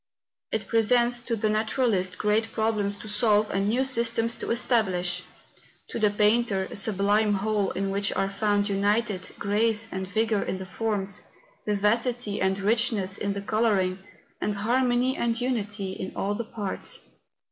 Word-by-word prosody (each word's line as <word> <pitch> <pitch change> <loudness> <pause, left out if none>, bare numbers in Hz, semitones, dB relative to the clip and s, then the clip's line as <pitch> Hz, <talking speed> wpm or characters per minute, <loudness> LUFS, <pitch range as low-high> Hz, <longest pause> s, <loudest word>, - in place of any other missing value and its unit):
It 220 -2 -1
presents 240 +2 +2
to 235 - 0
the 215 0 0
naturalist 215 -3 0
great 215 +2 +1
problems 215 -2 0
to 215 - -10
solve 210 0 +2
and 195 +1 0
new 255 +4 +2
systems 230 -2 +1
to - - -5
establish; 195 -7 +1 0.7
to - - -4
the 210 -1 +4
painter 210 -1 +2
a - - -6
sublime 205 +1 +2
whole 205 0 0
in 195 0 -2
which 200 +1 0
are 195 - 0
found 205 0 0
united 205 0 0
grace 215 +2 +1
and 190 0 -3
vigour 220 +1 +1
in - - -3
the 190 - -7
forms, 200 0 -2 0.5
vivacity 210 +2 0
and 190 0 +1
richness 205 -2 +1
in 200 -1 -1
the 200 - -4
colouring, 200 -3 +1 0.4
and 210 - -1
harmony 245 +4 +1
and 230 -1 0
unity 210 -6 -2
in 190 0 -6
all 200 +1 -1
the 230 +2 -4
parts. 210 -4 -1
210 Hz, 155 wpm, -26 LUFS, 200-230 Hz, 0.7 s, the